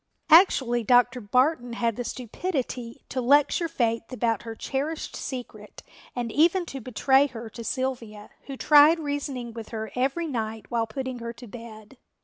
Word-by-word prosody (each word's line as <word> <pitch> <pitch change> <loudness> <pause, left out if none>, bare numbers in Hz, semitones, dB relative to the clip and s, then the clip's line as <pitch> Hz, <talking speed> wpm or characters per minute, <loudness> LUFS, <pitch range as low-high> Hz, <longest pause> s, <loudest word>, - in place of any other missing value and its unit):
Actually 265 -9 +5
Dr. 245 +2 +3
Barton 250 +3 +1
had 230 -1 -1
the 245 - -4
stupidity 250 - -4
to 260 - -2
lecture 290 +6 +3
Faith 230 -7 -1
about 230 -4 0
her 225 -1 -7
cherished 290 +7 -4
secret 255 -3 -8 0.3
and 240 -2 -3
even 340 - +3
to 275 -5 -7
betray 265 +4 +3
her 230 -4 -9
to 235 - -8
Sylvia, 235 -5 -4 0.2
who 275 -1 -6
tried 300 +4 +6
reasoning 285 -5 -4
with 225 -1 -8
her 220 -1 -5
every 270 +7 0
night 225 -6 -4
while 230 -1 0
putting 260 +2 -5
her 235 0 -6
to 245 - -12
bed. 225 +1 -12
250 Hz, 155 wpm, -26 LUFS, 230-275 Hz, 0.3 s, tried